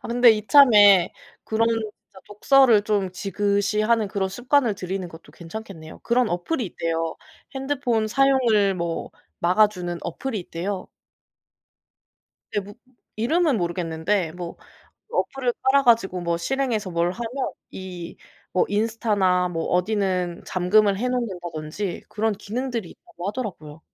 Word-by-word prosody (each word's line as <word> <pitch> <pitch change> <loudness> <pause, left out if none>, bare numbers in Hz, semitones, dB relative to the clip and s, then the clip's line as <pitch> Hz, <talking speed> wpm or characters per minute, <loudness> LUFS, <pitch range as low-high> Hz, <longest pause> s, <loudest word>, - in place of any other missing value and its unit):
아 - - -7
근데 245 0 +6
이참에 210 -4 +6 0.3
그런 225 +1 +1
진짜 215 -3 -5
독서를 225 +1 +4
좀 200 -3 0
지긋이 200 +2 0
하는 230 -2 +2
그런 190 -1 -1
습관을 245 +2 +1
들이는 185 -1 -4
것도 165 0 -14
괜찮겠네요. 170 -3 -9
그런 240 0 +1
어플이 220 - -2
있대요. 165 -2 -3 0.4
핸드폰 265 -5 -1
사용을 230 -5 +3
뭐 170 -2 -3 0.3
막아주는 180 -1 +2
어플이 220 +7 -4
있대요. 185 +3 -5 1.7
네 205 - 0
뭐 205 +1 -11 0.4
이름은 290 +4 +2
모르겠는데 170 +1 -1
뭐 175 0 -7 0.6
어플을 255 -3 -1
깔아 275 +1 +4
가지고 210 -6 +3
뭐 170 -1 -1
실행해서 230 0 -1
뭘 170 0 +1
하면 240 +5 -4 0.2
이 180 -2 -8 0.4
뭐 185 - +3
인스타나 205 -4 +1
뭐 165 -2 -3
어디는 180 -2 0
잠금을 195 +2 +2
해 250 - -1
놓는다든지 180 -7 -4
그런 220 0 0
기능들이 225 0 -4
있다고 175 +2 -9
하더라고요. 180 -10 -6
205 Hz, 300 characters per minute, -23 LUFS, 180-230 Hz, 1.7 s, 근데